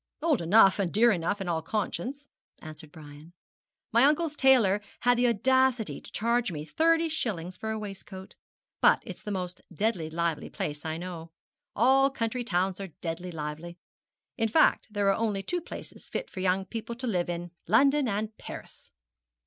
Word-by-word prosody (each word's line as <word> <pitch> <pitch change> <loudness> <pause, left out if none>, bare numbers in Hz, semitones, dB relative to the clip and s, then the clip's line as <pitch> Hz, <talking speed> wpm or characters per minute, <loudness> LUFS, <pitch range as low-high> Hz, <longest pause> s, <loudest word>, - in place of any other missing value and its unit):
'Old 310 - +2
enough, 195 +3 +5
and 185 -4 0
dear 235 +4 +5
enough, 190 +2 -1
in 190 - -4
all 165 -2 0
conscience,' 240 - -3 0.3
answered 155 -1 -10
Brian. 150 +2 -13 0.6
'My 235 +2 +5
uncle's 305 +1 +2
tailor 245 -8 +4 0.2
had 245 0 +4
the 245 +1 +3
audacity 255 +1 +2
to - - -12
charge 235 -1 +1
me 150 -2 -5
thirty 330 - +2
shillings 190 - -3
for 220 - -5
a 220 - -2
waistcoat. 195 -2 -8 0.5
But - - +5
it's - - -8
the 210 - -7
most 180 -3 -4
deadly 180 -3 -1
lively 170 -1 -2
place 150 +1 -5
I 160 0 -2
know. 170 -2 -7 0.5
All 270 +4 +5
country 245 -2 -2
towns 185 -3 0
are 190 -6 -8
deadly 175 +2 -4
lively; 160 +2 -6 0.6
in 225 -1 +2
fact, 310 +9 +3
there 205 -1 0
are - - +1
only 210 -3 -1
two 355 - -1
places - - -10
fit - - -4
for 190 - -7
young 190 +1 +1
people 230 +3 -6
to 250 +2 -6
live 180 -7 0
in 175 0 -4 0.2
London 275 - +4
and 215 +1 -2
Paris!' - - -10
205 Hz, 175 wpm, -28 LUFS, 175-245 Hz, 0.6 s, enough